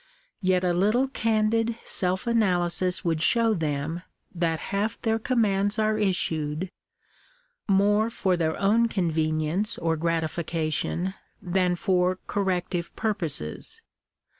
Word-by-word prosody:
Yet 185 Hz, -1 st, +2 dB
a 180 Hz, -1 st, +2 dB
little 215 Hz, +9 st, +2 dB
candid 225 Hz, -1 st, +1 dB
self 185 Hz, -1 st, -1 dB
analysis 185 Hz, -6 st, +1 dB
would 165 Hz, -2 st, 0 dB
show 230 Hz, +6 st, +4 dB
them 160 Hz, -1 st, -2 dB, 0.3 s
that 170 Hz, -2 st, 0 dB, 0.2 s
half 210 Hz, +3 st, -1 dB
their 225 Hz, -1 st, +1 dB
commands 210 Hz, -4 st, +1 dB
are 215 Hz, 0 st, +2 dB
issued 175 Hz, -4 st, -1 dB, 1.0 s
more 205 Hz, +2 st, +3 dB
for 190 Hz, -5 st, 0 dB
their 160 Hz, -2 st, -1 dB
own 220 Hz, +4 st, +3 dB
convenience 160 Hz, +1 st, 0 dB
or 165 Hz, -1 st, 0 dB
grati 165 Hz, 0 st, 0 dB
fication 165 Hz, +3 st, -2 dB, 0.3 s
than 180 Hz, 0 st, +1 dB
for 180 Hz, -1 st, +1 dB
corrective 180 Hz, -3 st, -2 dB
purposes. 170 Hz, -, -3 dB
185 Hz, 115 wpm, -26 LUFS, 165-215 Hz, 1.0 s, show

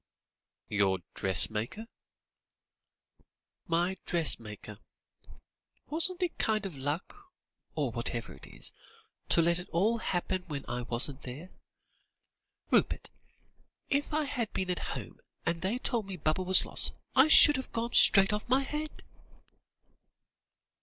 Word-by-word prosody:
"Your 100 Hz, -2 st, +1 dB, 0.2 s
dressmaker?" 110 Hz, -, +4 dB, 1.8 s
"My 175 Hz, +3 st, 0 dB
dressmaker. 110 Hz, -, -3 dB, 1.1 s
Wasn't 360 Hz, +4 st, +3 dB
it 350 Hz, -, -3 dB
kind 215 Hz, -2 st, 0 dB
of 185 Hz, -6 st, -6 dB
luck, 165 Hz, -, -5 dB, 0.4 s
or -, -, -1 dB
whatever -, -, -3 dB
it -, -, -12 dB
is, -, -, -6 dB, 0.6 s
to 170 Hz, -, +4 dB
let 170 Hz, +1 st, +3 dB
it 180 Hz, -, -7 dB
all 215 Hz, +7 st, +1 dB
happen 185 Hz, -1 st, -2 dB
when 145 Hz, -4 st, -6 dB
I 120 Hz, +1 st, -4 dB
wasn't 125 Hz, +4 st, -2 dB
there. 145 Hz, +9 st, -9 dB, 1.2 s
Rupert, -, -, +1 dB, 0.8 s
if 285 Hz, +2 st, 0 dB
I 305 Hz, +1 st, 0 dB
had 245 Hz, -6 st, -4 dB
been 185 Hz, -1 st, -2 dB
at 180 Hz, -, -3 dB, 0.2 s
home, -, -, -10 dB, 0.3 s
and 165 Hz, 0 st, -1 dB
they 195 Hz, +6 st, -1 dB
told 235 Hz, -5 st, -2 dB
me 190 Hz, -2 st, -7 dB
Baba 155 Hz, +3 st, -1 dB
was 185 Hz, 0 st, +6 dB
lost, -, -, +1 dB, 0.2 s
I 265 Hz, +3 st, +6 dB
should 295 Hz, -2 st, +7 dB
have 260 Hz, -, -7 dB
gone 235 Hz, +1 st, -3 dB
straight 195 Hz, 0 st, +6 dB
off 210 Hz, +3 st, -4 dB
my 260 Hz, +2 st, +3 dB
head." 300 Hz, +2 st, -6 dB
185 Hz, 125 wpm, -30 LUFS, 150-240 Hz, 1.8 s, should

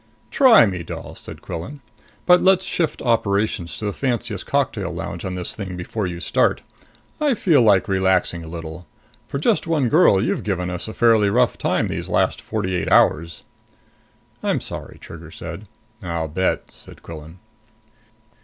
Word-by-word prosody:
"Try 255 Hz, -, +7 dB
me, 95 Hz, -4 st, -3 dB
doll," -, -, -8 dB
said -, -, -11 dB
Quillan. 90 Hz, -, -6 dB, 0.5 s
"But 180 Hz, 0 st, +6 dB
let's 190 Hz, 0 st, +4 dB
shift 165 Hz, -3 st, -1 dB
operations 100 Hz, -6 st, 0 dB
to 110 Hz, -, -5 dB
the 100 Hz, -, -1 dB
fanciest 120 Hz, -6 st, -3 dB
cocktail 125 Hz, -9 st, 0 dB
lounge 85 Hz, 0 st, -6 dB
on 95 Hz, -1 st, -4 dB
this 90 Hz, -1 st, -4 dB
thing 95 Hz, -4 st, -6 dB
before 95 Hz, +3 st, -3 dB
you 85 Hz, -1 st, -5 dB
start. 85 Hz, -, +1 dB, 0.6 s
I 295 Hz, -4 st, +2 dB
feel 160 Hz, -, +3 dB
like 100 Hz, -5 st, +4 dB
relaxing 95 Hz, -3 st, +1 dB
a -, -, -9 dB
little. 80 Hz, +1 st, -8 dB, 0.4 s
For -, -, -4 dB
just 185 Hz, +4 st, +1 dB
one 150 Hz, -7 st, +1 dB
girl, 150 Hz, -, +5 dB
you've 110 Hz, -, -1 dB
given 90 Hz, -3 st, -2 dB
us 90 Hz, -1 st, -5 dB
a 110 Hz, -, -7 dB
fairly 115 Hz, -3 st, +4 dB
rough 120 Hz, +4 st, +2 dB
time -, -, 0 dB
these -, -, -5 dB
last -, -, +1 dB
forty 95 Hz, 0 st, -3 dB
eight 90 Hz, -, -2 dB
hours!" 80 Hz, +1 st, +3 dB, 1.0 s
"I'm -, -, 0 dB
sorry," -, -, -7 dB
Trigger 80 Hz, -1 st, -11 dB
said. 85 Hz, +5 st, -8 dB, 0.3 s
"I'll 85 Hz, -3 st, -3 dB
bet," 95 Hz, +5 st, -1 dB
said -, -, -14 dB
Quillan. 80 Hz, +1 st, -10 dB
95 Hz, 165 wpm, -21 LUFS, 85-120 Hz, 1.0 s, Try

